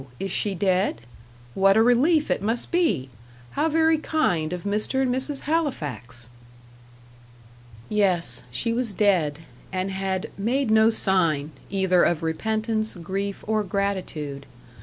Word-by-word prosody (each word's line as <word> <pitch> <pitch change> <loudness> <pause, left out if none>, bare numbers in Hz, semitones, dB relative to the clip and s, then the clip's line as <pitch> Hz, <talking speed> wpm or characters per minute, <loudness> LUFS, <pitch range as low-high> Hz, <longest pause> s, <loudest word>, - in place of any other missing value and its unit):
is 195 0 -3
she 200 +1 0
dead? 185 - +1 0.5
What 195 +1 +4
a 220 - +6
relief 290 +7 +3
it - - 0
must 225 +4 -1
be! 325 - +1 0.4
How 305 +3 0
very 320 0 +3
kind 180 - 0
of 180 -1 -4
Mr. 210 +6 0
and 250 -2 +1
Mrs. 270 +2 0
Halifax!" 150 - -2 1.6
Yes, 185 - 0
she 230 - -1
was 235 -3 -1
dead, 180 -8 +2 0.3
and 185 +1 -2
had 190 -1 -3
"made 240 +3 0
no 220 0 +6
sign," 170 -9 +1 0.2
either 190 -2 +2
of 165 -2 +1
repentance, 220 +6 -1
grief, 195 +3 -4
or 215 0 +1
gratitude. 180 -8 -3
200 Hz, 130 wpm, -24 LUFS, 175-230 Hz, 1.6 s, a